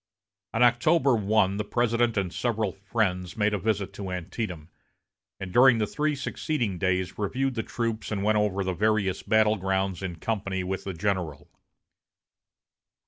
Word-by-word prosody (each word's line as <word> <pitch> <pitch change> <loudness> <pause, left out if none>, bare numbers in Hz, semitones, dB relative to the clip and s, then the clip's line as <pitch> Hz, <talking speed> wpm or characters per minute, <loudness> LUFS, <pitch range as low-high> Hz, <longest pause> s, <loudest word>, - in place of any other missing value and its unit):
On 115 - +4
October 130 +3 +4
1, 105 -2 +2
the 105 - -1
President 120 +1 +1
and 95 -3 -1
several 110 -4 -1
friends 95 -3 -2
made 105 0 +2
a 105 - 0
visit 100 -1 -1
to 100 -1 -6
Antietam, 90 -2 -5 0.7
and 95 -2 -6
during 125 -1 +7
the 110 - +1
three 150 +6 -1
succeeding 125 - -2
days 95 0 -1
reviewed 130 +6 -1
the 115 - -1
troops 115 -1 -3
and 100 -2 -1
went 105 0 +3
over 100 -2 0
the 95 0 -1
various 100 -1 +1
battle 110 0 +3
grounds 95 -1 -1
in 95 -3 -4
company 95 0 -2
with 95 +1 -4
the 95 -2 -4
general. 90 -5 -2
105 Hz, 155 wpm, -27 LUFS, 95-115 Hz, 0.7 s, during